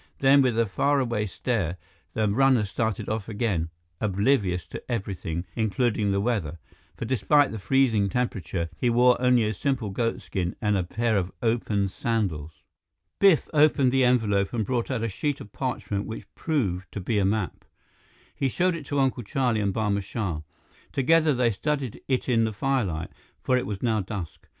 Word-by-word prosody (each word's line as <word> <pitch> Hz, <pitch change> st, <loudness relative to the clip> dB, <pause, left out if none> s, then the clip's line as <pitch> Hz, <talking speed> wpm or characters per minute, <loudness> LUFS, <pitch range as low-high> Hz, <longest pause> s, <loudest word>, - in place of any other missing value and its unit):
Then, 140 Hz, +1 st, +5 dB
with 125 Hz, -4 st, +1 dB
a 115 Hz, -, +3 dB
faraway 120 Hz, -1 st, 0 dB
stare, 95 Hz, -4 st, -2 dB, 0.4 s
the 110 Hz, -1 st, +2 dB
runner 125 Hz, +1 st, +3 dB
started 110 Hz, +2 st, -2 dB
off 110 Hz, 0 st, -3 dB
again, 100 Hz, -7 st, -1 dB, 0.3 s
oblivious 100 Hz, -3 st, +1 dB
to -, -, -6 dB
everything 95 Hz, -6 st, -3 dB
including 110 Hz, -2 st, +1 dB
the 100 Hz, -, +1 dB
weather, 100 Hz, -8 st, -1 dB, 0.4 s
for -, -, -4 dB
despite 135 Hz, +4 st, +3 dB
the 110 Hz, -, -5 dB
freezing 115 Hz, -3 st, +2 dB
temperature, 95 Hz, -8 st, -2 dB
he 125 Hz, -, +2 dB
wore 125 Hz, +1 st, +5 dB
only 125 Hz, -2 st, +4 dB
a 110 Hz, 0 st, 0 dB
simple 125 Hz, -1 st, -1 dB
goat 115 Hz, +3 st, -1 dB
skin 90 Hz, -2 st, -3 dB
and 105 Hz, -2 st, +1 dB
a 95 Hz, -, +2 dB
pair 110 Hz, +5 st, -1 dB
of 95 Hz, -1 st, -1 dB
open 110 Hz, -3 st, +1 dB
sandals. 95 Hz, -8 st, -3 dB, 0.6 s
Biff 195 Hz, -6 st, +5 dB
opened 145 Hz, -4 st, +4 dB
the 135 Hz, 0 st, +3 dB
envelope 110 Hz, -6 st, +2 dB
and 110 Hz, -3 st, 0 dB
brought 120 Hz, +1 st, -1 dB
out 125 Hz, -4 st, -1 dB
a -, -, +1 dB
sheet 145 Hz, +8 st, -2 dB
of 105 Hz, -7 st, -11 dB
parchment 105 Hz, -6 st, -3 dB
which 110 Hz, -, -6 dB
proved 95 Hz, -, -2 dB
to -, -, -4 dB
be 105 Hz, +3 st, 0 dB
a -, -, +2 dB
map. 100 Hz, -1 st, -1 dB, 0.7 s
He 135 Hz, -, 0 dB
showed 180 Hz, +7 st, +1 dB
it 155 Hz, -4 st, -8 dB
to 145 Hz, -, -1 dB
Uncle 130 Hz, -2 st, +1 dB
Charlie 120 Hz, 0 st, 0 dB
and 100 Hz, -1 st, +1 dB
Barma 100 Hz, -1 st, 0 dB
Shah. 95 Hz, -6 st, -3 dB, 0.5 s
Together, 155 Hz, +3 st, +3 dB
they 120 Hz, -1 st, +2 dB
studied 135 Hz, +2 st, -2 dB
it 130 Hz, -2 st, 0 dB
in 115 Hz, -3 st, +3 dB
the 110 Hz, -, -2 dB
firelight, 105 Hz, -10 st, -1 dB, 0.3 s
for 130 Hz, -, +2 dB
it 125 Hz, -6 st, 0 dB
was 100 Hz, +1 st, -5 dB
now 110 Hz, -3 st, +2 dB
dusk. 95 Hz, -4 st, -7 dB
110 Hz, 175 wpm, -26 LUFS, 100-130 Hz, 0.7 s, Then